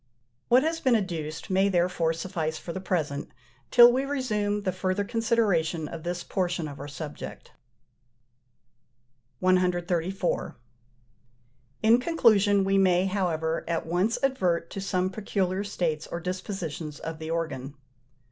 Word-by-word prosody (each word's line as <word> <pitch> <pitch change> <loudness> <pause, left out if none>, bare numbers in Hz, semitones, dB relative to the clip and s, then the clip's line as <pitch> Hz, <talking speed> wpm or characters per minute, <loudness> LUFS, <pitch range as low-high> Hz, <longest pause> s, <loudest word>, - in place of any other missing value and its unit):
What 250 +3 +5
has 325 +1 0
been 260 -6 +3
adduced 165 -6 -3
may 190 +1 +3
therefore 175 -3 +1
suffice 165 -2 -3
for 170 - -7
the 190 - -5
present, 160 -6 -2 0.4
till 240 -1 +9
we 260 +2 +1
resume 210 -7 -1
the 185 - 0
further 185 +2 -1
consideration 200 -8 +1
of 165 - -7
this 175 +1 -3
portion 175 -3 -1
of 140 -1 -9
our 140 - -6
subject. 145 +1 -8 1.9
134. 180 0 0 1.3
In 225 +2 +6
conclusion 215 - +4
we 195 0 +2
may, 185 -1 +4
however, 165 -5 -1
at 165 -1 -1
once 180 +7 +1
advert 180 -11 +1
to 195 - -5
some 185 -1 0
peculiar 195 -2 -1
states 165 -6 -2
or 170 - -4
dispositions 175 -4 -5
of 160 -1 -6
the 160 0 -6
organ. 145 -5 -3
185 Hz, 130 wpm, -27 LUFS, 165-205 Hz, 1.9 s, till